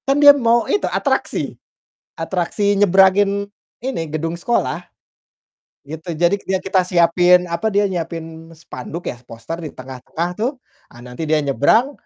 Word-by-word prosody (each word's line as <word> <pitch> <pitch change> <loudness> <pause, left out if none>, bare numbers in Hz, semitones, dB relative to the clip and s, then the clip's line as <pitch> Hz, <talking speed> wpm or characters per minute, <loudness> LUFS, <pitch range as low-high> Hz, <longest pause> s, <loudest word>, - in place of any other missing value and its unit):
Kan, 275 +1 +2
dia 290 0 +9
mau 235 -4 +2
itu 410 - 0
atraksi, - - -1 0.6
atraksi 190 +4 -1
nyebrangin, 200 +1 +3 0.3
ini, 260 -7 -3
gedung 165 +2 -3
sekolah, 235 +7 -1 1.0
gitu. 160 +3 -7
Jadi, 175 +5 +2
k - - -21
dia 190 0 0
kita 190 -1 +1
siapin, 180 0 +4
apa, 170 +6 -1
dia 205 -1 +2
nyiapin 165 -1 -6
spanduk 165 +1 -8
ya, 120 - -12
poster 115 +9 -7
di - - -8
tengah-tengah 130 +6 -5
tuh, 240 +5 +1 0.4
ah, 120 0 -15
nanti 125 +6 -6
dia 155 -1 +2
nyebrang, 145 - +2
175 Hz, 145 wpm, -19 LUFS, 160-200 Hz, 1.0 s, dia